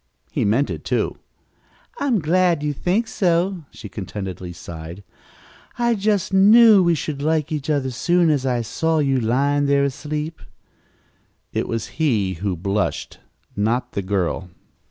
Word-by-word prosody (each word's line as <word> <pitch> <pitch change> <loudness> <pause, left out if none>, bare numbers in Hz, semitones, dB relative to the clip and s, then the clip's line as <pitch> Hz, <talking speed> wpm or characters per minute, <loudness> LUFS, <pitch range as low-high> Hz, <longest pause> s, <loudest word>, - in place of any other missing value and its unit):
He - - 0
meant 115 +8 +2
it, - - -6
too. - - -1 0.8
"I'm 270 -4 +1
so 200 - +1
glad 170 0 +2
you 150 -1 0
think 190 - 0
so," 175 -2 0
she 110 - -10
contentedly 95 -3 -6
sighed. 85 +2 -9 0.7
"I 235 -1 +2
just 205 -3 0
knew 210 +2 +7
we 170 -2 +3
should 145 -1 -4
like 155 0 0
each 150 -1 -3
other 145 -3 +1
as 120 - -8
soon 175 0 +3
as 140 -3 0
I 125 -3 0
saw 160 +8 0
you 135 -3 +2
lying 140 +5 +1
there 140 0 +3
asleep." 150 +3 -4 1.1
It - - -1
was 115 +7 -5
he 105 -11 +1
who 100 -1 -1
blushed, 100 +4 -2 0.4
not 115 +5 0
the 100 - -2
girl. 95 -1 -2
145 Hz, 155 wpm, -21 LUFS, 110-170 Hz, 1.1 s, knew